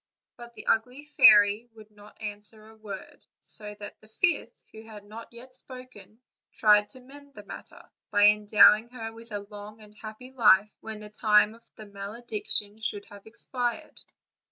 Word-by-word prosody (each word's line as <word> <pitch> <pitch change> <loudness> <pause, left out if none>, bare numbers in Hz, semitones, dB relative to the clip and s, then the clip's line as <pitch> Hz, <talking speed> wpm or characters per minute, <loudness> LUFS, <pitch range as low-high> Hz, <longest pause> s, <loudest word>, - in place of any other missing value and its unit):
But 235 0 -13
the - - -11
ugly 250 +5 0
fairy 225 -5 +5
would 215 -1 -16
not 210 0 -18
answer 210 0 -6
a 220 0 -16
word 205 -3 -10 0.2
so 210 -1 -2
that 205 0 -11
the 215 - -19
fifth, 265 +1 -1
who 220 - -12
had 220 -2 -12
not 215 +3 -11
yet 245 +2 -14
spoken, 255 -5 -8 0.3
tried 210 -1 +4
to 260 - -14
mend 280 +2 -15
the 210 - -11
matter, - - -12 0.2
by 205 - +2
endowing 210 +2 +5
her 225 -3 -7
with 230 0 -14
a 205 -1 -4
long 210 +1 -10
and 210 -1 -16
happy 220 +4 -11
life 210 -5 +4
when 220 -1 -8
the 210 - -10
time 210 0 +3
of 230 - -18
the 215 - -11
malediction 210 +1 -4
should 205 -2 -4
have 200 +1 -14
expired. 245 +5 -3
215 Hz, 170 wpm, -27 LUFS, 210-235 Hz, 0.3 s, fairy